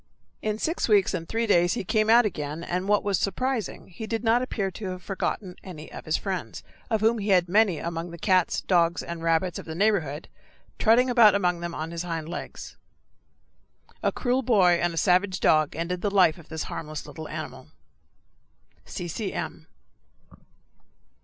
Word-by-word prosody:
In 215 0 -1
six 320 +2 -1
weeks 205 -3 +4
and 165 -3 -4
three 230 +1 0
days 175 -4 +3
he - - -2
again 215 +3 +1
came - - 0
out, 235 +1 +7
and 165 +5 -3
what 210 0 +3
was 200 -2 +1
surprising, 245 0 -2
he 220 +5 -7
did 225 0 -2
not 230 +2 +3
appear 205 -6 -2
to 200 +2 -6
have 185 -1 -7
forgotten 190 -1 -3
any 160 -5 -9
of - - -9
his 155 - +1
friends, 185 - -5 0.3
of 220 -3 0
whom 225 +1 +3
he 205 +1 -3
had 180 -2 +4
many 200 -2 +3
among 170 +1 -4
the 170 - -9
cats, 185 0 +2
dogs, 170 -2 +2
and 170 -1 -6
rabbits 165 +1 +1
of - - -9
the 160 - -5
neighborhood, 170 -7 0 0.5
trotting 235 +3 +4
about 235 -5 +6
among 180 -3 +1
them 170 0 -5
on 160 +1 -4
his 170 -1 -4
hind 165 -3 -4
legs. 175 - -7 1.2
A - - +1
cruel 250 0 0
boy 190 -8 +4
and 175 - +1
a 165 - -7
savage 185 +3 +2
dog 155 -1 +3
ended 175 +2 -3
the 205 - +1
life 180 -5 +4
of 165 - -16
this 160 -1 -4
harmless 155 -1 -6
little 160 -1 -8
animal. - - -7 1.2
C. 175 - -6
C. 195 +4 -3
M. - - -5
185 Hz, 185 wpm, -26 LUFS, 170-215 Hz, 1.2 s, out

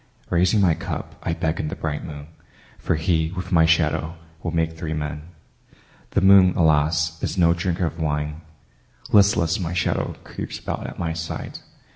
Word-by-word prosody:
Raising 90 +4 +3
my 90 -4 +4
cup - - -5
I 85 - -1
beckon 80 -2 -2
the - - -4
bright 75 -2 -3
moon, 75 0 -8 0.5
For - - 0
he, 80 0 0
with 90 -1 -5
my 80 -2 +5
shadow, 80 0 +1 0.3
will 85 - -3
make 80 -1 -1
three 80 -1 -4
men. 75 -1 -4 1.0
The - - +5
moon, 95 -1 +6
alas, 80 0 +2
is - - -2
no 85 -2 +5
drinker 90 +1 -1
of 80 0 -4
wine; 75 0 -2 0.7
Listless, 100 -5 +4
my 90 -2 -3
shadow 85 - -1
creeps - - -6
about - - -5
at - - -9
my 85 -1 -2
side. 80 0 -5
80 Hz, 165 wpm, -23 LUFS, 80-85 Hz, 1.0 s, moon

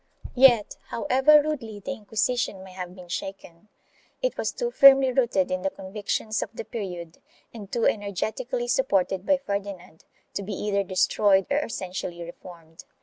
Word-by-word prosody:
1 260 +1 +6
Yet, 235 -5 -1
however 265 +5 +4
rudely 245 -9 -4
the 205 - -5
Inquisition 220 -3 -2
may 190 - -12
have 180 -1 -7
been 180 -2 -12
shaken, 180 0 -7 0.5
it - - -1
was - - -2
too 485 -1 -3
firmly 270 - +7
rooted 235 -8 +1
in 185 0 -1
the 195 - 0
convictions 205 +3 -3
of - - -4
the - - -6
period 180 -7 -6 0.3
and 205 -4 -10
too 235 - 0
energetically 220 +5 -2
supported 195 -7 +1
by 285 - +4
Ferdinand 200 - -6 0.3
to - - -3
be 200 +1 -5
either 200 +1 0
destroyed 195 +1 +2
or 285 - +3
essentially 185 - -5
reformed. 170 -1 -12
205 Hz, 155 wpm, -25 LUFS, 185-245 Hz, 0.5 s, firmly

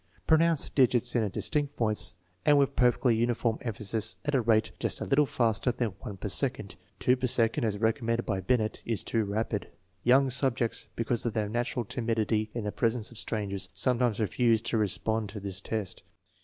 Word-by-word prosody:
Pro 160 - +5
nounce 165 -3 +3
the - - -5
digits 125 -2 +3
in 120 - +3
a 105 - 0
distinct 145 +7 -1
voice 110 -5 +1 0.3
and 145 - +5
with 140 0 +2
perfectly 125 -1 +3
uniform 115 0 0
emphasis 110 -1 -2
at 145 - -1
a 135 - +3
rate 110 -1 +2
just - - -1
a - - -3
little 145 +1 +3
faster 115 0 +1
than 120 -1 -1
one 100 - -7
per - - -5
second. - - -2 0.2
Two 125 - +3
per 130 0 -1
second, 115 +2 +2
as 105 -2 -1
recommended 115 +2 0
by 95 -3 -1
Binet, 110 +2 0
is 115 -3 -1
too 115 -1 0
rapid. 105 0 -2 0.4
Young 130 +2 +4
subjects, 125 -2 0
because 115 0 -1
of 115 - -2
their 110 -2 -1
natural 120 +1 -2
timidity 110 -1 -1
in 120 - -2
the 105 - -2
presence 115 0 -1
of 115 - -7
strangers, 100 -4 -3
sometimes 125 -4 +1
refuse 115 +1 +2
to 115 0 -1
respond 110 +1 0
to 105 +1 -7
this 100 -1 -4
test. 105 -3 -4
115 Hz, 195 wpm, -29 LUFS, 110-125 Hz, 0.4 s, Pro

